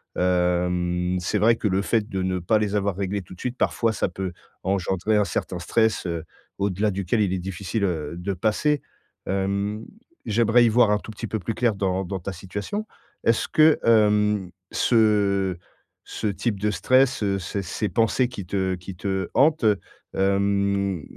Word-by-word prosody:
hem, 90 0 +1
c'est 95 +4 -1
vrai 115 +3 +5
que 110 - -2
le 95 0 +1
fait 110 0 0
de 95 -3 -3
ne 95 0 0
pas 105 +5 +2
les 105 -1 -1
avoir 100 -2 0
réglé 100 0 -2
tout 85 - -13
de 90 - -15
suite, 125 0 -3
parfois 115 -2 +1
ça 95 - -1
peut 95 0 -4 0.3
engendrer 95 +2 0
un 105 - +3
certain 90 -2 -3
stress, 110 +6 +1
heu, 85 -2 -3 0.4
au-delà 100 +2 0
duquel 100 +3 0
il 95 -3 +1
est 95 - -1
difficile, 95 +3 -3
heu, 80 -6 -1
de 90 +3 -3
passer. 110 - +1 0.4
Hem, 100 +3 -1 0.4
j'aimerais 115 +2 +4
y - - +4
voir 115 -1 +4
un 105 - +2
tout - - -12
petit 110 +2 -6
peu 110 - -2
plus 110 +3 -4
clair 120 -3 +2
dans 95 -1 -1
dans 95 +2 -4
ta 95 +3 -5
situation. 100 - -5 0.4
Est-ce 115 0 +2
que, 155 0 +5
hem, 105 -3 +3 0.2
ce 100 -5 +2 0.5
ce - - -6
type 105 0 -2
de 105 +1 +1
stress, 130 +6 +3
heu, 100 -1 +1
ces 95 +2 -4
ces 100 +3 -3
pensées 115 +6 +2
qui 105 -7 -7
te 95 0 0
qui 90 +1 -9
te 95 +1 -2
hantent, 155 +1 +4
heu, 105 -3 +3 0.4
hem, 100 -2 +1
100 Hz, 180 wpm, -24 LUFS, 95-110 Hz, 0.5 s, vrai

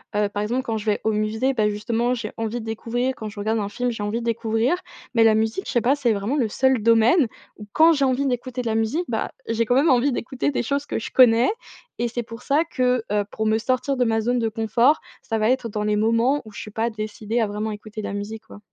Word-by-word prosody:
heu, 205 -1 +2
par 205 0 -3
exemple, 245 +5 -1
quand 225 -4 -2
je 210 - -6
vais 210 - +2
au 220 - +2
musée, 220 +5 0
bah, 215 -3 +2
justement 230 +4 -1
j'ai 220 -3 -5
envie 225 +1 -2
de - - -9
découvrir, 240 +3 -2
quand 215 - -6
je 205 0 -10
regarde 220 +2 0
un 200 -1 -2
film, 245 +4 -2
j'ai 225 - -6
envie 210 +3 -1
de 235 - -6
découvrir, 230 +5 +1 0.4
mais 225 - +5
la 220 -1 +6
musique, 220 - -1
je - - -3
sais 240 - +3
pas, 260 +4 +3
c'est 270 -5 +1
vraiment 205 +6 -2
le 245 -6 +2
seul 265 0 +2
domaine 230 +6 +5 0.3
où 210 - -9
quand 325 +1 +6
j'ai 280 -3 +2
envie 260 +1 +1
d'écouter 250 0 -2
de - - -4
la 220 - 0
musique, 225 +11 0
bah, 220 -2 -2 0.2
j'ai 230 0 0
quand 245 - +1
même 290 +5 +4
envie 260 +1 +3
d'écouter 255 +2 -2
des 275 - -1
choses 280 +4 -1
que - - -2
je 225 - -6
connais 240 -1 +6 0.5
et 240 - +1
c'est 240 +1 -3
pour 230 +1 -10
ça 290 +3 +2
que, 250 -6 0
heu, 205 -1 +1
pour 220 - -3
me 220 0 +3
sortir 255 +4 0
de 250 - +2
ma 225 -1 +1
zone 245 +3 0
de 225 -1 0
confort, 230 +7 +2 0.2
ça 225 - -2
va 215 +1 +2
être 255 -2 0
dans 210 0 -3
les 210 0 +1
moments 230 +6 +2
où 215 - -11
je - - -9
suis 210 - -9
pas 225 +2 -1
décidée 215 +1 -3
à 220 - +1
vraiment 210 +2 -3
écouter 215 +1 -7
de - - -3
la - - -5
musique, 205 +2 -5
quoi. - - -12
230 Hz, 270 wpm, -23 LUFS, 215-250 Hz, 0.5 s, la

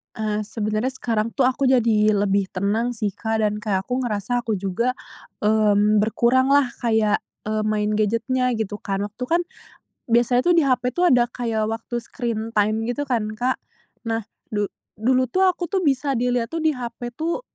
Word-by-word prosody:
Eee, 215 -1 -1
sebenarnya 215 +3 -2
sekarang 230 -3 -2
tuh 270 - +2
aku 260 +1 +2
jadi 220 -4 +3
lebih 200 -1 +1
tenang, 215 +6 0
sih, 215 -2 -1
Kak, 220 +2 -2
dan 210 0 0
kayak 200 -3 -1
aku 250 +5 -2
ngerasa 240 0 -1
aku 225 -2 -1
juga, 200 +6 -1 0.5
mmm, 210 0 +4
berkurang 235 +4 +2
lah, 275 -2 +4
kayak, 220 -3 +2 0.3
eee, 215 0 -1
main 210 0 0
gadget-nya, 230 +4 +1
gitu 210 -1 -3
kan. 195 -1 -2
Waktu 210 +4 -6
kan 340 +4 +2 0.7
biasanya 240 +1 +3
tuh - - +5
di 330 - +5
HP 255 -2 +2
tuh 355 - +2
ada 240 -1 +4
kayak 225 -3 -1
waktu 225 +2 -4
screen 230 -2 -4
time, 210 +1 +3
gitu 285 +4 -1
kan, 235 -6 -1
Kak. 250 +3 0 0.5
Nah, 225 -1 -1 0.3
du 210 -1 0 0.3
dulu 255 +4 +3
tuh, 380 +7 +3
aku 360 -1 -1
tuh, 385 - +1
bisa 280 -3 +1
dilihat 245 -1 0
tuh, 330 - -2
di 315 0 +2
HP 240 -1 -6
tuh, 335 +7 -1
230 Hz, 180 wpm, -22 LUFS, 215-250 Hz, 0.7 s, tuh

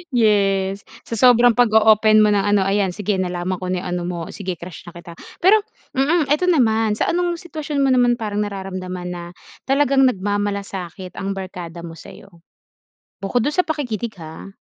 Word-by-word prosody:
Yes, 195 -3 +1 0.2
sa 230 - -5
sobrang 245 0 +6
pag-o-open 220 -2 +5
mo 210 - +3
ng 205 - +3
ano, 205 0 +2
ayan 195 -2 0
sige 205 -2 -1
nalaman 180 0 -2
ko 185 - -5
na 180 -1 -2
yung - - -5
ano 180 - -2
mo 175 -1 -4
sige, 185 -3 -5
crush 175 +1 -11
na 175 - -11
kita. 170 0 -11 0.3
Pero 420 +4 +6 0.4
mm, 295 +1 +2
eto 360 +5 +2
naman, 225 -9 +2
sa - - 0
anong 350 0 0
sitwasyon 305 -4 -4
mo 270 - +3
naman 245 -1 +3
parang 210 -3 -4
nararamdaman 185 -3 -5
na 175 -1 -6 0.4
talagang 270 -1 +3
nagmamalasakit 200 -4 -3
ang 195 0 -3
barkada 175 -3 -7
mo 165 - -7
sa'yo? 185 +4 -13 0.9
Bukod 220 +5 0
dun 295 - 0
sa 365 - +3
pakikinig 245 - -4
ha. 160 +3 -10
205 Hz, 170 wpm, -20 LUFS, 185-245 Hz, 0.9 s, sobrang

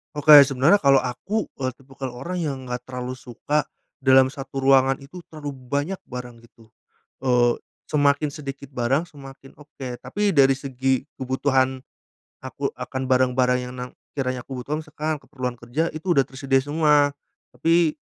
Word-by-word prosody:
Oke, 150 +1 +4 0.2
sebenarnya 140 +9 +4
kalau 140 -4 +4
aku, 195 - -2 0.2
eee, 130 -2 -2
tipikal 135 0 -8
orang 175 +9 -4
yang 150 -5 -2
enggak 125 -1 -4
terlalu 125 0 -5
suka 145 +6 -2 0.3
dalam 130 -1 +5
satu 135 -1 -6
ruangan 135 0 +5
itu 150 +7 -11
terlalu 150 -2 -7
banyak 140 +7 -3
barang 125 -1 -8
gitu. 115 -1 -21 0.5
Eee, 125 -2 +2 0.2
semakin 145 0 +1
sedikit 140 -2 -8
barang, 130 +4 +1
semakin 135 -2 -13
oke, 130 -4 -8
tapi 205 +7 -1
dari 135 -5 +5
segi 130 -1 -1 0.2
kebutuhan, 130 0 0 0.6
aku 135 +2 -3
akan 130 +1 -4
barang-barang 125 -1 +3
yang 125 - -7
na 125 - -5 0.2
sekiranya 130 -3 -3
aku 130 -2 -6
butuhkan, 150 +5 -4
sekalian 155 +1 -3
keperluan 130 -3 -5
kerja 120 +8 -2
itu 175 +3 0
udah 140 -5 +4
tersedia 135 0 +1
semua. 145 0 +2 0.4
Tapi 165 +3 +3
135 Hz, 150 wpm, -23 LUFS, 130-145 Hz, 0.6 s, dalam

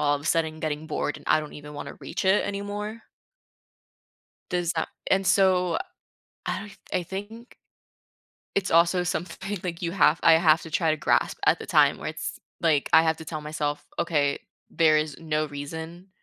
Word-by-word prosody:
all 145 -1 +3
of 145 - -10
a - - -13
sudden 160 -1 0
getting 155 0 -3
bored 150 -1 -2
and - - -14
I - - +5
don't 150 - -8
even 150 0 -10
wanna 145 - -7
reach 190 - -4
it 190 +2 +4
anymore. 205 +2 -4 1.5
Does 175 -2 0
that - - -2 0.2
and 190 0 +3
so 185 -3 +3 0.7
I - - -1
don't 205 -2 -10 0.2
I 180 -1 +1
think 205 +6 -8 1.0
it's 195 -2 0
also 170 +2 +4
something, 190 +3 -3
like, 170 -2 -4
you 170 0 -1
have 165 -5 +4
I 165 - +7
have 160 0 +4
to 165 - -9
try 165 -1 +1
to 155 - +1
grasp - - +1
at - - +5
the - - -8
time - - +4
where - - -4
it's - - -5 0.2
like, 155 -4 +2
I 160 - +8
have 160 -1 +1
to 160 - -8
tell 155 0 -5
myself, 150 -1 -3
"Okay, 145 -4 +1 0.3
there 155 -2 +4
is 150 -2 -2
no 155 -1 -1
reason 160 +5 -7
165 Hz, 185 wpm, -26 LUFS, 155-190 Hz, 1.5 s, I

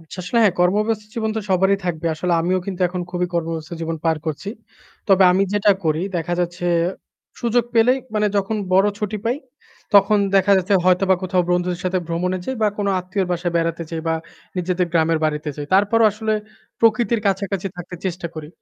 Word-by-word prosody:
আচ্ছা, 165 +2 -12
আসলে 235 - 0
হ্যাঁ 200 -4 +4
কর্মব্যস্ত 210 +4 +2
জীবন 220 -1 -1
তো - - 0
সবারই 190 +2 +3
থাকবে। 170 -2 -2
আসলে 175 +3 -1
আমিও 185 +2 +1
কিন্তু 190 -2 -5
এখন 180 +1 -4
খুবই 180 0 -1
কর্মব্যস্ত 165 -2 -3
জীবন 165 0 -3
পার 165 -1 +2
করছি। 155 +5 -4 0.6
তবে 195 -1 +5
আমি 190 +2 +3
যেটা 205 0 +3
করি 155 +1 +1
দেখা 170 +1 -2
যাচ্ছে 175 0 -2 0.7
সুযোগ 235 0 +2
পেলেই 245 +3 +4 0.2
মানে 210 0 +2
যখন 200 +2 0 0.2
বড় 190 +2 +5
ছুটি 210 0 -2
পাই, 235 +3 +1 0.6
তখন 200 +1 +6 0.2
দেখা 195 +1 +4
যাচ্ছে 190 +2 +1
হয়তোবা 185 +1 +4
কোথাও 185 -1 +1
বন্ধুদের 180 0 0
সাথে 185 0 +1
ভ্রমণে 180 +2 -1
যাই 265 - -3
বা 215 - +4
কোনো 200 -1 0
আত্মীয়র 185 +1 -2
বাসায় 175 0 -2
বেড়াতে 165 0 -1
যাই 165 -1 -3
বা 160 - +2 0.4
নিজেদের 180 0 0
গ্রামের 165 -1 +2
বাড়িতে 150 0 -1
যাই। 145 -1 -5
তারপরও 205 +4 +4
আসলে 215 +1 -2 0.5
প্রকৃতির 230 0 +3
কাছাকাছি 195 -1 -1
থাকতে 180 0 -8
চেষ্টা 180 -1 -3
করি। 155 -2 -7
185 Hz, 185 wpm, -21 LUFS, 170-205 Hz, 0.7 s, তখন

